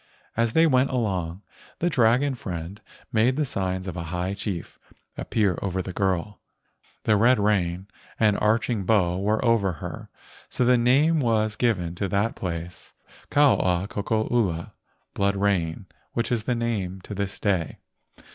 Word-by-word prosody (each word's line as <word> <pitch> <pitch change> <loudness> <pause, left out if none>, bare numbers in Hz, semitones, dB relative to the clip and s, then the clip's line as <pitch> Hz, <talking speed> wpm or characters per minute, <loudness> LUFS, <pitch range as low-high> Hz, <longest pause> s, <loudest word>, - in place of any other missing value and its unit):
As 115 0 +1
they 165 - +5
went 130 -3 +3
along, 95 -7 -2 0.3
the 175 - 0
dragon 130 -1 +3
friend 95 -3 -6 0.3
made 120 +4 +3
the 150 - +1
signs 95 -5 -2
of 90 -3 -5
a 85 -2 -4
high 90 +2 -2
chief 100 -4 -5 0.4
appear 100 -6 0
over 95 -1 -2
the 95 0 -4
girl. 95 +1 -1 0.6
The 110 - +3
red 120 +5 +5
rain 95 -3 0 0.3
and 105 -2 +4
arching 110 0 +1
bow 90 -4 +2
were 105 +4 0
over 110 -6 +3
her, 75 - -8 0.4
so 125 - 0
the 125 +1 +5
name 140 +7 +3
was 110 -4 +1
given 100 -8 0
to 100 +3 -2
that 100 +4 0
place, 85 -1 -6 0.4
Ka 145 -1 +5
ua 90 +1 0
koko 110 +2 -1
ula 95 -9 0 0.4
(blood 100 0 +1
rain), 95 -3 0 0.3
which 115 +1 -1
is 115 -3 0
the 125 - 0
name 105 -6 -2
to 105 - -8
this 100 -1 -3
day. 95 -6 0
100 Hz, 155 wpm, -25 LUFS, 95-115 Hz, 0.6 s, they